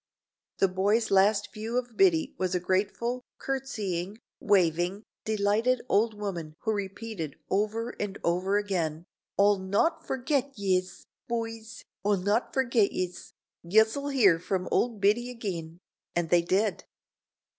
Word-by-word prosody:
The 195 - +4
boys 200 +5 +1
last 200 +1 +3
view 225 +3 -3
of 245 -2 -3
Biddy 180 -5 +3
was 185 0 0
a - - +2
grateful, 205 +7 -1 0.2
curtseying, 210 -8 -3 0.2
waving, 180 0 +2 0.2
delighted 220 +4 +1
old 215 +2 +2
woman 175 -7 -5
who 220 - 0
repeated 200 -5 -4 0.2
over 215 +4 0
and 205 -1 -3
over 185 +4 +1
again, 170 -6 -1 0.3
"O'll 200 0 +4
not 200 - +1
forgit 265 +1 -1
yez, 185 -2 -1 0.2
B'ys, 225 -1 -4 0.2
O'll 205 0 +2
not 205 +6 0
forgit 235 -6 +2
yez. 180 -1 -4 0.3
Yez'll 220 +10 +2
hear 205 -12 +4
from 185 +1 -2
old 230 -4 +1
Biddy 220 +5 +3
agin," 175 -9 -5 0.4
and 170 -1 -1
they 175 -1 +6
did. 195 +4 0
205 Hz, 130 wpm, -28 LUFS, 185-225 Hz, 0.4 s, they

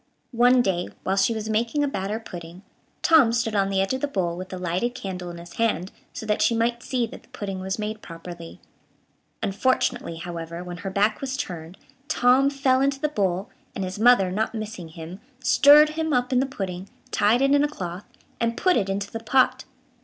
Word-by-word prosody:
One 245 +1 +5
day, 180 -4 0 0.2
while 190 - 0
she 195 +3 +3
was 220 -1 -4
making 230 +7 0
a - - +1
batter 210 -4 -3
pudding, 175 -3 -10 0.4
Tom 305 -8 +6
stood 230 -1 0
on 195 -1 +2
the 195 -1 0
edge 195 +5 0
of 260 - -3
the 290 - +1
bowl, 180 -10 -1
with 185 +1 -7
a 185 - -5
lighted 180 +7 -1
candle 180 -6 -5
in 170 - -8
his 170 0 -11
hand, 215 -5 0 0.2
so - - -7
that 210 -1 0
she 230 - +3
might 235 +1 0
see 250 -1 -1
that 225 - -10
the - - -26
pudding 195 -2 -5
was 190 0 -3
made 215 0 -4
properly. 170 0 -10 0.8
Unfortunately, 245 -2 0
however, 170 0 -6
when 175 -1 -7
her 195 +1 -5
back 205 +3 +1
was 265 -1 -3
turned, 175 -4 -6 0.3
Tom 265 -2 +4
fell 270 -2 +2
into 275 0 +1
the 300 +1 0
bowl, 195 -7 -1 0.2
and 195 - -2
his 185 +2 -5
mother, 220 -5 +5
not 220 +4 -1
missing 215 -5 -6
him, 165 +3 -9 0.2
stirred 290 +4 +7
him 315 0 -2
up 250 +1 +1
in 250 - +4
the 265 - +1
pudding, 190 -6 -5 0.2
tied 220 +5 +3
it 275 +1 +4
in 285 0 +4
a - - +3
cloth, 180 -9 -6 0.3
and 230 0 0
put 365 -1 +3
it 195 -4 +1
into 200 +1 -3
the 225 - -4
pot. 255 +3 +2
215 Hz, 210 wpm, -24 LUFS, 185-250 Hz, 0.8 s, stirred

